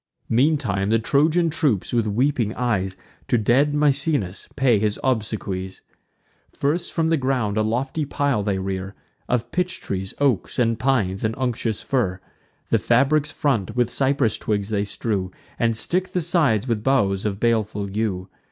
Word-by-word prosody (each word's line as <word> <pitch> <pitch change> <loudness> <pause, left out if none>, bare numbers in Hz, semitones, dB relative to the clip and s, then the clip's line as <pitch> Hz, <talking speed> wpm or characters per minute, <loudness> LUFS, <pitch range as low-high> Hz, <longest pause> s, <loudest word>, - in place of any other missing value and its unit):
Meantime 115 -7 +1
the 115 - +4
Trojan 155 +9 +2
troops, 140 - 0
with 115 -2 +2
weeping 120 0 0
eyes, 95 -6 -1 0.3
To 120 - +2
dead 130 +7 +2
Misenus 145 - +1
pay 125 -6 +3
his 105 0 -1
obsequies. 105 -6 -2 0.7
First, 165 +5 -1
from 160 -1 0
the 165 - +3
ground 130 -6 0
a 110 - +2
lofty 130 +8 -1
pile 140 -5 0
they 100 -1 -1
rear, 95 +1 -4 0.3
Of 125 -1 -1
pitch 180 -1 -1
trees, 95 0 -4
oaks, 135 -8 0
and 115 -2 +1
pines, 110 -8 0
and 110 +1 0
unctuous 120 -4 -2
fir: 100 -9 0 0.5
The - - +4
fabric's 140 +5 +2
front 115 - -1
with 120 -1 +1
cypress 135 -4 +1
twigs 105 -1 -1
they 105 -2 0
strew, 100 -2 -2 0.3
And 115 -1 +2
stick 185 +10 0
the 180 - +1
sides 150 - +2
with 115 -3 -1
boughs 100 -8 +2
of 100 -2 -2
baleful 110 -3 0
yew. 100 -4 -1
115 Hz, 155 wpm, -23 LUFS, 105-140 Hz, 0.7 s, the